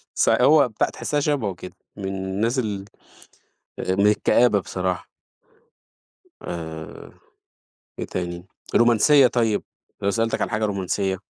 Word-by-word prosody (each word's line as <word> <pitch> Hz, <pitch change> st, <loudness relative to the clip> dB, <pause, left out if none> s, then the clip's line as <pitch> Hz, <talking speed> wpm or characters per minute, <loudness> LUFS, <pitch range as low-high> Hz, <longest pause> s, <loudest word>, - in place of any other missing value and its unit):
ص -, -, +2 dB
هو 145 Hz, -3 st, +5 dB
بتاع 110 Hz, -, 0 dB
تحسها 145 Hz, -1 st, -2 dB
شبهُه 140 Hz, -10 st, -1 dB
كده، 90 Hz, +1 st, -11 dB, 0.2 s
من 100 Hz, -, -7 dB
الناس 95 Hz, +6 st, -2 dB
ال 105 Hz, -5 st, -2 dB, 1.0 s
من 95 Hz, +2 st, +1 dB
الكآبة 105 Hz, 0 st, +3 dB
بصراحة. 90 Hz, -1 st, -3 dB, 1.3 s
آآ 80 Hz, -2 st, -7 dB, 0.9 s
إيه -, -, -3 dB
تاني؟ 85 Hz, 0 st, -5 dB, 0.3 s
رومانسية 120 Hz, +4 st, +5 dB
طيب، 115 Hz, -4 st, +1 dB, 0.4 s
لو 100 Hz, -, +2 dB
سألتك 115 Hz, +1 st, -1 dB
على -, -, -1 dB
حاجة 110 Hz, -1 st, -1 dB
رومانسية. 95 Hz, -1 st, -1 dB
105 Hz, 115 wpm, -23 LUFS, 95-120 Hz, 1.3 s, هو